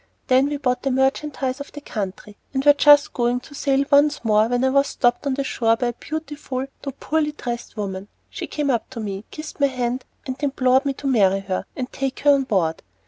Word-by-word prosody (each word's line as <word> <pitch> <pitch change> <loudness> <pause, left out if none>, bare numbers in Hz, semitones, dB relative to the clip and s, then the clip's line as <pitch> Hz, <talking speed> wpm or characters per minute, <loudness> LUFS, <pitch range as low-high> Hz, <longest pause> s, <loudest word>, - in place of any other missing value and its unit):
Then 260 +2 +5
we 290 0 -2
bought 250 -3 0
the 275 - -1
merchandise 265 0 0
of 285 - -8
the 290 - -7
country, 205 -4 -6 0.2
and 265 +1 0
were 290 - +8
just 290 0 +6
going 240 0 +1
to 285 - -14
sail 275 -1 +1
once 290 -2 +4
more, 215 0 +4
when 245 +1 0
I 265 - +4
was 275 +1 +3
stopped 245 +2 +1
on 270 - +1
the 275 - -1
shore 230 -4 +1
by 245 0 0
a - - -4
beautiful 290 -2 -5 0.2
though 275 - -5
poorly 300 -1 0
dressed 240 -5 -6
woman. 195 -1 -4 0.2
She - - -6
came 290 -2 -1
up 235 -3 -1
to 260 - -8
me, 200 -1 -5
kissed 310 0 -9
my 280 - +4
hand, 255 -1 -2 0.2
and 260 +1 -5
implored 265 -1 +2
me 280 - 0
to 280 - -11
marry 195 -7 +3
her, 190 -1 -3
and 255 -1 -4
take 270 -1 -3
her 290 - +6
on 275 -1 +3
board. 180 -9 0
260 Hz, 225 wpm, -22 LUFS, 235-280 Hz, 0.2 s, were